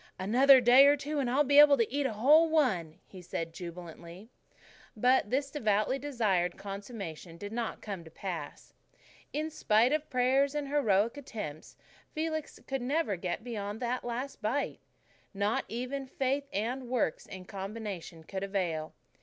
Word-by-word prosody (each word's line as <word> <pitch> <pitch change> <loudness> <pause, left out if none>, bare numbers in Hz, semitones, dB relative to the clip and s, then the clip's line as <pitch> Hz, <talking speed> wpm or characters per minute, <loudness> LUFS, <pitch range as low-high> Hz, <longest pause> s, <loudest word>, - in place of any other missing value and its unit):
"Another 255 +8 +6
prayer 265 +4 +8
or - - -1
two, 290 +2 -3
and 260 -3 0
I'll 275 +4 +3
be 285 +1 +5
able 290 -1 +8
to 230 0 0
eat 285 -1 +1
a 235 - -4
whole 300 +10 +5
one," 195 - +1
he 185 - -12
said 165 -1 -5
jubilantly. 175 +3 -9 0.7
But 250 -1 +3
this 275 +3 -1
devoutly 215 -1 +1
desired 215 -11 0
consummation 195 -5 -7
did 205 +4 -7
not 230 0 -4
come 195 -5 -5
to 160 - -13
pass. 165 -3 -7 0.6
In 310 +2 -3
spite 235 -2 +3
of 305 0 -1
prayers 265 +3 +2
and 290 -2 -2
heroic 230 -4 +2
attempts, 210 - -7 0.4
Felix 315 -1 -3
could 270 -1 -3
never 275 -3 0
get 180 +3 -4
beyond 210 -3 -5
that 250 +1 -2
last 245 +3 -5
bite. 245 +7 -1 0.6
Not 200 +2 0
even 255 +4 -4
faith 275 +2 -1
and 240 +5 -3
works 245 -10 -1
in 185 -1 -9
combination 195 -4 -7
could 190 +4 -5
avail. 175 -6 -2
235 Hz, 155 wpm, -30 LUFS, 195-275 Hz, 0.7 s, prayer